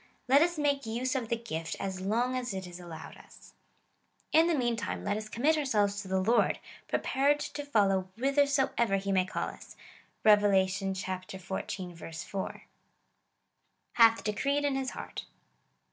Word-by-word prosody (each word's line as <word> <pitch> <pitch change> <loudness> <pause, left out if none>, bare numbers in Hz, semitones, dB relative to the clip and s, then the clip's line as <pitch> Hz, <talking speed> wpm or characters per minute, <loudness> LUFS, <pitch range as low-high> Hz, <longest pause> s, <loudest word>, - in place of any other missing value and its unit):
Let 275 +3 +6
us 345 0 +2
make 285 -4 0
use 245 +3 -1
of 250 -5 -2
the 235 - +2
gift 165 -8 -4
as 190 -1 -4
long 235 +6 0
as 245 -5 -3
it 190 -1 -4
is 175 0 -9
allowed 170 -3 -9
us. - - -17 0.8
In 320 +2 +5
the 340 - +2
meantime, 240 -4 -1
let 205 - 0
us 215 0 -5
commit 300 +8 +2
ourselves 205 -7 +1
to 200 - -10
the 190 0 +1
Lord, 225 +6 +3 0.3
prepared 280 +2 +1
to 290 0 -5
follow 195 -8 +2
whithersoever 270 -5 +2
he 195 0 -2
may 185 -1 +3
call 190 - -3
us. - - -13 0.5
(Rev. 210 -1 +7
xiv. 190 -3 -2
4.) 195 -1 -5 1.3
Hath 230 -1 +5
decreed 280 +7 0
in 280 -2 +1
his 265 -1 -1
heart. - - -7
220 Hz, 150 wpm, -30 LUFS, 190-270 Hz, 1.3 s, Rev